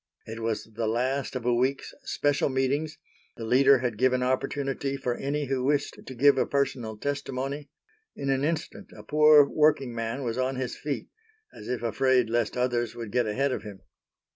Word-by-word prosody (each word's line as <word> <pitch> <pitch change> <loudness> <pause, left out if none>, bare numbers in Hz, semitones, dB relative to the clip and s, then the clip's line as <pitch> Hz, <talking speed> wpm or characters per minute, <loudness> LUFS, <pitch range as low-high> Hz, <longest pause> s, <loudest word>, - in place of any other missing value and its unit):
It 110 +1 -7
was 115 -1 -2
the 110 0 -4
last 130 +4 -1
of 125 -2 -4
a 125 - +3
week's 130 +3 0
special 145 - 0
meetings, 140 +4 -1 0.4
the 115 - -5
leader 135 +4 +5
had 120 -4 -3
given 125 0 +3
opportunity 135 +1 -1
for 125 -2 -2
any 145 +4 -2
who 130 -1 -1
wished 145 +1 0
to 130 - -9
give 140 +2 +5
a - - +1
personal 125 -6 -1
testimony; 140 +2 -4 0.5
in 140 -1 -2
an 135 0 0
instant 160 +1 -3
a 105 - -10
poor 150 +3 +6
working 145 -5 +2
man 115 +4 -3
was 120 0 -2
on 130 +1 0
his 130 -1 -3
feet, 145 -1 -4 0.4
as - - -11
if 125 -1 -2
afraid 125 0 +2
lest 120 0 0
others 120 -2 0
would 115 -3 -7
get 120 -1 +1
ahead 135 +6 0
of - - -2
him. 100 -3 -10
130 Hz, 185 wpm, -27 LUFS, 120-140 Hz, 0.5 s, poor